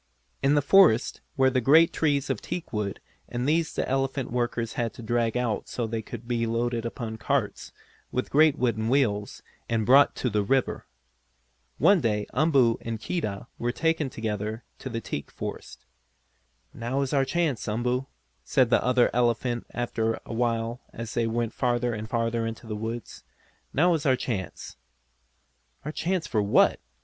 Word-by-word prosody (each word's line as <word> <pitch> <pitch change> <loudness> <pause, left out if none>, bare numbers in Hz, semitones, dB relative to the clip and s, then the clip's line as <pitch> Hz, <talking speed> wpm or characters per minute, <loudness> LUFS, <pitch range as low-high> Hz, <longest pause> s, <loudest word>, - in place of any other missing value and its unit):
In 140 +2 +3
the 145 - +3
forest 155 - +5 0.2
were 130 -1 +4
great 140 +6 +5
trees 140 -3 +1
of 125 - -3
teakwood 105 - -4 0.3
and 125 +2 -2
these 160 +1 +2
the - - -2
elephant 135 -1 -1
workers 120 -1 -1
had 115 -2 -2
to 120 - -9
drag 115 +1 0
out 120 -4 -1
so 120 - -2
they 110 0 -3
could 115 +1 -9
be 115 -1 0
loaded 115 0 -1
upon 115 -2 -5
carts, - - -1 0.4
with 125 - -2
great 155 0 +5
wooden 115 -3 0
wheels, 105 -7 0 0.3
and 115 -2 +1
brought 140 +4 +6
to 125 - -1
the 105 0 +2
river. 130 +6 0 0.9
One 200 -4 +5
day 105 -4 0
Umboo 135 -5 +3
and 115 -1 -4
Keedah 105 - -3
were 120 +1 0
taken 160 0 0
together 110 0 -4 0.2
to 130 - -6
the 115 -2 -4
teak 70 -8 -5
forest. - - -7 0.9
"Now 120 +4 -2
is 135 - -3
our 135 -1 +4
chance, 155 -4 -1
Umboo," 125 +4 -1 0.4
said 125 - +2
the - - +4
other 125 -1 +3
elephant 120 0 0
after 115 -2 -1
a - - -6
while 115 0 -1
as 115 0 -6
they 115 -1 +1
went 115 0 -1
farther 120 -1 0
and 110 0 -5
farther 115 0 0
into 115 +1 -7
the 110 -1 -4
woods. 115 +2 -5 0.5
"Now 175 +5 +3
is 155 -3 -1
our 130 - +5
chance!" 105 - -5 1.1
"Our 150 - -2
chance 175 +1 -1
for 110 - 0
what?" 100 0 +4
120 Hz, 165 wpm, -26 LUFS, 115-135 Hz, 1.1 s, brought